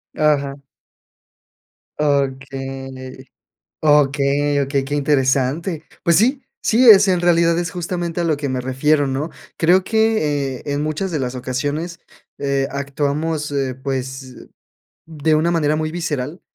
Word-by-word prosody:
Ajá. 140 -2 +1 1.4
Okey, 135 -2 -3 0.6
okey, 145 -1 +3
okey, 140 0 0
qué 145 +2 -3
interesante. 145 +4 0 0.2
Pues 170 -1 +4
sí, 255 +6 +3 0.2
sí, 235 +2 +5
es 205 -1 +8
en 180 -2 +2
realidad 170 -1 +3
es 170 -2 -2
justamente 175 0 -4
a - - -1
lo 160 -3 +1
que 140 -1 -4
me 130 -1 -2
refiero, 145 +3 +1
¿no?, 135 +4 -2 0.3
creo 180 +3 +4
que, 155 - +1
eh, - - -14
en 145 0 -2
muchas 155 +5 -2
de 155 - -1
las 125 0 -3
ocasiones, 145 +7 -3 0.4
eh, 140 -1 0
actuamos, 145 +2 -2
eh, 135 -3 -1
pues, 130 -1 -6 0.6
de 155 0 +1
una 165 +3 +2
manera 155 -2 +1
muy 155 0 -1
visceral, 155 -2 -4
145 Hz, 135 wpm, -20 LUFS, 135-165 Hz, 1.4 s, es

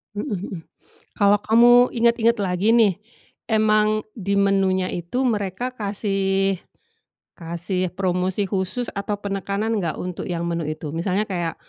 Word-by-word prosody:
Mhm 205 - -3
mhm. 195 -1 -4 0.6
Kalau 200 0 +5
kamu 240 +2 +6
ingat-ingat 235 -1 +2
lagi 195 +2 +1
nih, 225 -5 +4 0.6
emang 215 0 +3 0.2
di 200 -3 -2
menunya 190 -2 +2
itu 175 +10 -2
mereka 215 +3 -2
kasih, 195 -2 0 0.8
kasih 170 +2 -3
promosi 185 +1 0
khusus 195 +5 -2
atau 205 +1 -3
penekanan 200 +2 -2
enggak 170 -5 -2
untuk 180 -1 -5
yang 170 -2 -3
menu 170 -2 -2
itu? 155 -1 -5
Misalnya 180 +5 0
kayak, 175 -3 -2
195 Hz, 130 wpm, -22 LUFS, 180-215 Hz, 0.8 s, kamu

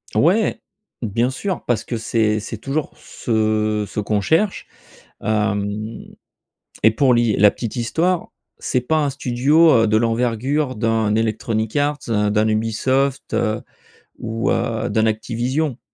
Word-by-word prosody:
Ouais! 195 +8 +2 0.4
Bien 115 +2 0
sûr. 190 +7 -4
Parce 120 -3 0
que 120 - -4
c'est 110 -1 +1
c'est 110 +1 -6
toujours 140 +6 -3
ce 110 -2 -1
ce - - -5
qu'on 105 0 0
cherche, 185 - +1 0.5
hem, 105 +1 -1 0.8
et 110 - +6
pour 130 +3 +3
li, 120 -3 +2
la 105 +1 +6
petite 115 -1 -5
histoire, 165 +9 0 0.3
c'est 125 - 0
pas 155 +6 0
un - - 0
studio, 140 +5 +3
heu, - - +2
de 110 +1 +3
l'envergure 125 +5 0
d'un 110 -1 +1
Electronic 110 0 -1
Arts, 145 0 +1
heu, 105 -2 +1
d'un 105 +1 +2
Ubisoft, 130 +5 0
heu, 110 -1 0 0.6
ou, 115 0 -2
heu, 115 -1 -1
d'un 110 -1 +2
Activision. 120 +5 -1
115 Hz, 140 wpm, -20 LUFS, 110-135 Hz, 0.8 s, et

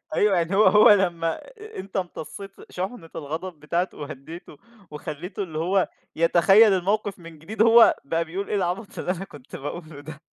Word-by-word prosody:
أيوه 205 -3 +3
يعني 170 +3 0
هو 215 - +5
هو 210 +3 +7
لمّا 170 -5 +2 0.4
أنت 195 +1 -7
امتصيت 190 +2 -6 0.2
شُحنة 185 -2 -5
الغضب 160 +2 -6
بتاعته 170 +4 -2
وهديته 150 +3 -9 0.3
وخليته 155 +6 -6
اللي 160 -5 -6
هو 185 +3 +1 0.3
يتخيّل 195 +6 +5
الموقف 200 +2 -1
من 165 -2 -12
جديد، 210 +8 -2
هو 230 0 +7
بقى 165 +4 -1
بيقول 185 +5 -5
إيه 210 - -1
العبط 190 +3 -3
اللي - - -3
أنا 185 +1 -3
كنت 145 -8 -12
باقوله 155 +1 -7
ده. 155 0 -10
175 Hz, 165 wpm, -24 LUFS, 160-195 Hz, 0.4 s, هو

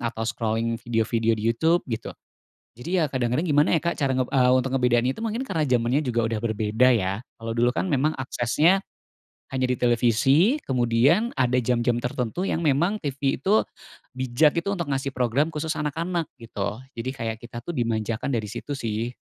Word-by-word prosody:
atau 115 -1 -3
scrolling 115 0 -1
video-video 115 0 0
di 105 - -5
YouTube, 165 +8 +2
gitu. 115 -3 -5 0.6
Jadi, 170 +11 -2
ya, 155 - +2
kadang-kadang 130 +4 -1
gimana 150 +1 +3
ya - - -11
Kak, 170 +1 -1
cara 135 -3 +1
nge 130 -1 +1
eee, 130 -2 +4
untuk 130 0 +1
ngebedain 125 -1 +2
itu 135 - -6
mungkin 225 +2 -2
karena 165 - -1
zamannya 125 +2 +1
juga 120 -1 0
udah 115 - -1
berbeda, 110 +2 +1
ya? 95 -2 0 0.2
Kalau 115 0 -7
dulu 120 +2 +2
kan - - -1
memang 150 +2 +1
aksesnya 130 +8 +2 0.7
hanya 130 -1 0
di 125 - 0
televisi, 125 - +3
kemudian 130 - +2
ada 125 -1 +2
jam-jam 120 0 +1
tertentu 125 - -2
yang 165 - -1
memang 160 +8 +2
TV 140 -6 -1
itu 200 - +3 0.6
bijak 130 +5 +2
gitu 200 +4 -1
untuk 170 -6 -3
ngasih 135 -1 -2
program 130 +6 0
khusus 155 +1 -3
anak-anak, 165 +2 -2
gitu. 115 0 -4 0.2
Jadi 115 +3 -3
kayak 115 -4 -4
kita 120 0 -7
tuh 170 +7 -6
dimanjakan 115 +1 -1
dari 110 -4 -2
situ, 145 - -6
sih. 115 -2 -3
125 Hz, 175 wpm, -24 LUFS, 115-150 Hz, 0.7 s, eee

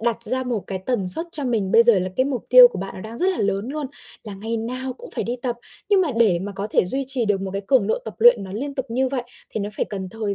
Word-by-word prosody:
đặt 235 0 -1
ra 255 +4 0
một 245 -4 -2
cái 190 - -4
tần 220 -8 0
suất 325 - -4
cho 290 - -1
mình 220 -6 -1
bây 230 +1 +7
giờ 230 -4 +5
là 185 - -2
cái 260 - +3
mục 265 -4 -3
tiêu 250 0 +10
của 220 - -7
bạn 195 +1 -6
nó - - -8
đang 220 +3 -8
rất 375 +2 +3
là 370 - -3
lớn 200 +2 -1
luôn, 295 +1 -3 0.4
là 210 -2 -7
ngày 225 +4 -4
nào 255 +3 -4
cũng 250 - -12
phải - - -3
đi 240 +2 -3
tập, 240 -1 -3 0.3
nhưng 400 -2 +4
mà 360 - +1
để 210 -7 +4
mà 200 +3 -5
có 195 +1 -4
thể - - +3
duy 265 +9 -1
trì 260 -2 0
được 205 -2 +1
một 195 0 -4
cái 195 +1 -4
cường 255 -5 +3
độ 220 - 0
tập - - -7
luyện 485 - +6
nó 190 - -8
liên 275 +7 -4
tục 265 -1 -3
như 255 +3 0
vậy 260 -2 -2 0.3
thì 215 - -3
nó 205 - -3
phải - - 0
cần 190 -3 -6
thời 215 -1 -3
230 Hz, 315 wpm, -22 LUFS, 200-260 Hz, 0.4 s, tiêu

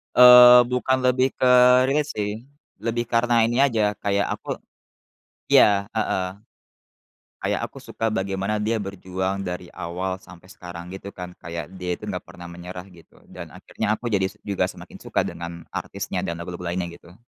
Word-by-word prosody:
Eee, 125 0 +10
bukan 130 +1 +1
lebih 130 +1 +3
ke 130 - +2 0.4
relate 150 +2 +1
sih, 105 -1 -2 0.5
lebih 120 +1 -1
karena 115 0 +3
ini 120 +3 +1
aja, 115 -7 +3
kayak 100 0 0
aku - - -5 1.0
iya, 100 -7 +5
heeh. 105 -3 0 1.1
Kayak - - -2
aku - - -13
suka 115 -1 -3
bagaimana 100 0 -2
dia 110 +2 0
berjuang 95 0 -4
dari 90 0 -5
awal 95 +2 -4
sampai 90 0 -16
sekarang, 90 -3 -9
gitu 95 +1 -8
kan. 90 -1 -7
Kayak 85 -1 -5
dia 90 -1 -4
itu - - -16
enggak - - -4
pernah 90 0 -11
menyerah 90 +1 -8
gitu. 85 -2 -20
Dan - - -10
akhirnya - - -5
aku 120 +2 -5
jadi 95 -3 +2 0.2
juga 100 -2 -1
semakin 95 - -11
suka - - -1
dengan 85 0 -7
artisnya - - -4
dan 85 - -3
lagu-lagu 90 0 -7
lainnya, 90 -1 -2
gitu. 90 +8 -19
100 Hz, 160 wpm, -23 LUFS, 90-115 Hz, 1.1 s, Eee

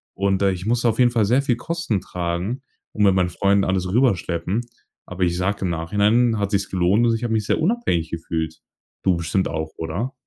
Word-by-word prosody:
und, 100 0 0
äh, 100 - +4
ich 90 +1 -5
musste 120 +1 +2
auf - - -1
jeden 125 -1 +4
Fall 115 -4 +2
sehr 125 +6 +2
viel 125 -3 +1
Kosten 165 - -2
tragen 90 +9 -3 0.3
und 105 - +1
mit 100 -2 +5
meinen 90 -1 +2
Freunden 100 +2 +2
alles 95 -1 0
rüberschleppen. 95 -4 +1 0.4
Aber 90 0 -3
ich 85 0 +1
sage 95 +3 0
im 95 - 0
Nachhinein 105 +7 +2
hat 100 -1 0
sich's 100 -2 -1
gelohnt 95 +5 +3
und 115 - +3
ich 115 +2 -2
habe 115 -1 -1
mich 110 -2 0
sehr - - +1
unabhängig 165 - 0
gefühlt. 80 -1 -3 0.5
Du 90 -3 +3
bestimmt 85 +3 -1
auch, 80 +1 -4
oder? 90 +11 -3
100 Hz, 210 wpm, -22 LUFS, 90-115 Hz, 0.5 s, mit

